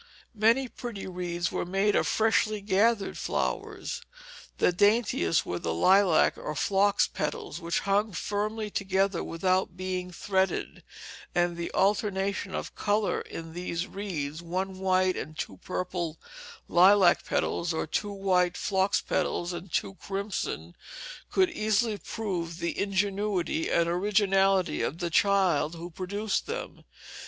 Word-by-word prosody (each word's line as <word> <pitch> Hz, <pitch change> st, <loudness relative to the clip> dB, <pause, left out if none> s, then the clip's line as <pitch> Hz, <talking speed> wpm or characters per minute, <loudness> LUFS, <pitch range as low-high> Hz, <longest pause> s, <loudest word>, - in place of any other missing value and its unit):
Many 230 Hz, +5 st, +3 dB
pretty 235 Hz, -4 st, -7 dB
wreaths 175 Hz, -2 st, -3 dB
were -, -, -1 dB
made 195 Hz, +3 st, +1 dB
of -, -, +2 dB
freshly 215 Hz, -1 st, +2 dB
gathered 205 Hz, +1 st, +1 dB
flowers. -, -, -3 dB, 0.6 s
The -, -, +3 dB
daintiest 205 Hz, -, +2 dB
were 90 Hz, -, -3 dB
of -, -, -8 dB
lilac 180 Hz, -, +4 dB
or 150 Hz, -, -4 dB
phlox 200 Hz, +6 st, +3 dB
petals, 150 Hz, +1 st, -4 dB
which 170 Hz, 0 st, -1 dB
clung 205 Hz, +2 st, +1 dB
firmly 210 Hz, +3 st, -2 dB
together 195 Hz, -2 st, 0 dB
without 185 Hz, +1 st, 0 dB
being 185 Hz, -1 st, -3 dB
threaded, 190 Hz, 0 st, -1 dB, 0.5 s
and 175 Hz, 0 st, +2 dB
the 170 Hz, 0 st, -4 dB
alternation 200 Hz, -1 st, 0 dB
of -, -, -4 dB
color 205 Hz, 0 st, 0 dB
in 165 Hz, 0 st, -8 dB
these 175 Hz, 0 st, -3 dB
wreaths 165 Hz, -7 st, -4 dB
one 185 Hz, +2 st, -3 dB
white 185 Hz, -1 st, +2 dB
and 155 Hz, 0 st, -6 dB
two -, -, -5 dB
purple 175 Hz, -3 st, -4 dB, 0.5 s
lilac 185 Hz, 0 st, +6 dB
petals, 170 Hz, 0 st, -1 dB
or 160 Hz, -, -1 dB
two 205 Hz, +6 st, -2 dB
white 185 Hz, -3 st, +1 dB
phlox 190 Hz, 0 st, +1 dB
petals 175 Hz, -1 st, -1 dB
and 175 Hz, +1 st, -7 dB
two -, -, -1 dB
crimson 195 Hz, -, -4 dB, 0.6 s
could 375 Hz, -2 st, +3 dB
easily 215 Hz, -3 st, +1 dB
prove 175 Hz, -7 st, -4 dB
the 170 Hz, -1 st, -3 dB
ingenuity 195 Hz, -3 st, 0 dB
and 170 Hz, 0 st, +2 dB
originality 195 Hz, 0 st, +2 dB
of 155 Hz, -, -2 dB
the 175 Hz, -1 st, -3 dB
child 180 Hz, -5 st, +3 dB
who 170 Hz, +1 st, -8 dB
produced 200 Hz, +4 st, -2 dB
them. -, -, -6 dB
190 Hz, 130 wpm, -28 LUFS, 175-205 Hz, 0.6 s, lilac